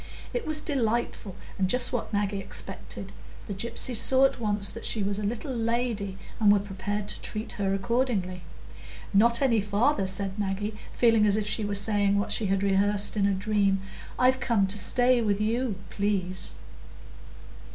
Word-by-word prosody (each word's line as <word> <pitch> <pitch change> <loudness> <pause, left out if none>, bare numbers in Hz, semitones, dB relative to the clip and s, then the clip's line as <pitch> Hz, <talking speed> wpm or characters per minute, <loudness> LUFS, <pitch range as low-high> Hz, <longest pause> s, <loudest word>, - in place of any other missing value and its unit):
It 485 -7 -3
was 310 -1 0
delightful, 235 - -2 0.2
and 190 -1 +1
just 250 +4 +1
what 245 - -3
Maggie 205 -1 -1
expected; 195 - -8 0.3
the 205 - -5
gypsies 235 +4 -1
saw 260 +4 +4
at 270 - 0
once 205 -3 +3
that 230 - -8
she 215 - -1
was 200 +1 -1
a - - -4
little 240 +6 -3
lady, 230 -4 -2 0.2
and 210 -2 +5
were 205 - +5
prepared 200 +1 -4
to - - -1
treat 215 +2 -5
her 195 -4 -1
accordingly. 195 -4 -1 0.7
"Not 235 +5 +4
any 230 -5 +3
farther," 205 +3 +1
said 195 +1 +1
Maggie, 205 +1 -2 0.2
feeling 225 -3 +3
as 205 0 +3
if 215 - -1
she 215 - -1
were 205 0 -2
saying 200 0 +2
what 200 - -1
she 215 - 0
had 195 +1 0
rehearsed 200 +1 +3
in 200 -1 +2
a 200 - +1
dream. 195 -1 +1 0.4
"I'm 255 +1 +4
come 240 -6 +1
to 195 +2 0
stay 250 +1 +3
with 205 -2 0
you, 225 +1 -1 0.2
please." 190 -2 -1
210 Hz, 170 wpm, -27 LUFS, 200-235 Hz, 0.7 s, and